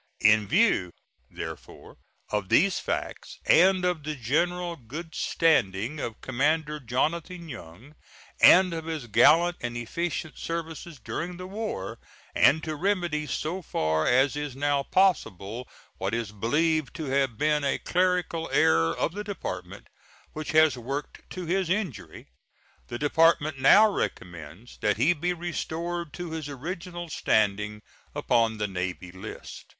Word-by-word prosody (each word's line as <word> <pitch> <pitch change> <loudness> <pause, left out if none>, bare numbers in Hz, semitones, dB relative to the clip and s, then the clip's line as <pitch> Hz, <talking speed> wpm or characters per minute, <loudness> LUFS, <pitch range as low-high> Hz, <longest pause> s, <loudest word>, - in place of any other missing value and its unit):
In 105 -1 +5
view, 180 - +3 0.4
therefore, - - -9 0.3
of 105 -3 -2
these 195 -1 +4
facts, - - -4
and 185 +2 +5
of 180 -3 0
the 150 +1 -4
general 170 +8 -1
good 155 +6 -9
standing 125 - +1
of 115 -5 -5
Commander 150 +4 0
Jonathan 165 +7 -2
Young, 115 - -11 0.5
and 185 -1 +7
of 160 -1 -5
his 160 -5 -4
gallant 160 +10 +5
and 120 -1 -4
efficient 160 +6 -4
services 165 -2 -5
during 175 +2 -5
the 180 - -7
war, 195 - -5 0.3
and 160 +2 +4
to 155 - -3
remedy 175 -4 -1
so 170 +6 -3
far 80 - 0
as 130 +3 +3
is 145 -3 -4
now 145 0 +1
possible 125 - 0 0.3
what - - -1
is 115 -3 -3
believed 150 +7 0
to 160 - -5
have 135 -4 0
been 150 +1 +1
a 140 - +1
clerical 180 -2 0
error 80 0 +3
of - - 0
the 205 +2 -5
Department, 205 -2 -6 0.5
which 155 0 -6
has 155 -2 +5
worked 135 +4 -6
to 185 -1 -6
his 185 +1 0
injury, 145 - -3 0.6
the 120 - -5
Department 155 0 +2
now 205 +11 +7
recommends 90 - -5
that 105 -1 +1
he 145 +10 +4
be 175 +3 -2
restored 170 -1 -4
to 175 +2 -6
his 160 -2 -5
original 175 +5 -6
standing 105 -6 0 0.3
upon 115 -2 +1
the 105 0 -1
navy 90 -1 -4
list. 95 +4 -9
150 Hz, 140 wpm, -27 LUFS, 115-170 Hz, 0.6 s, and